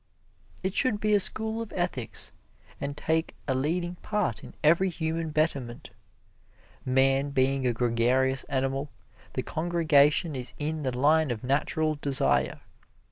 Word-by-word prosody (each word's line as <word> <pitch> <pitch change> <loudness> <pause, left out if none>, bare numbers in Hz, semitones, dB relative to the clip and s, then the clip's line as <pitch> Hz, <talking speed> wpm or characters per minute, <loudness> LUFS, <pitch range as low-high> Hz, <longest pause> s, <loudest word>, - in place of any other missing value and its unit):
It 190 0 -1
should 240 -4 +2
be 215 0 +1
a 205 - +5
school 220 +3 +4
of 225 - -7
ethics, 175 -10 -2 0.5
and 140 +1 -5
take 160 +1 -1
a 135 - +1
leading 175 +6 -2
part 210 +2 -2
in - - -12
every 170 +5 +4
human 160 -1 -3
betterment. 140 -6 -2 0.9
Man 135 +2 +2
being 135 -1 +1
a - - +2
gregarious 125 +3 +1
animal, 135 +1 -2 0.4
the - - -2
congregation 155 -2 +2
is 125 -1 -5
in 155 +1 -3
the 130 -3 -3
line 155 +3 +3
of 115 -3 -4
natural 150 +4 0
desire. 65 - +1
145 Hz, 135 wpm, -27 LUFS, 130-170 Hz, 0.9 s, a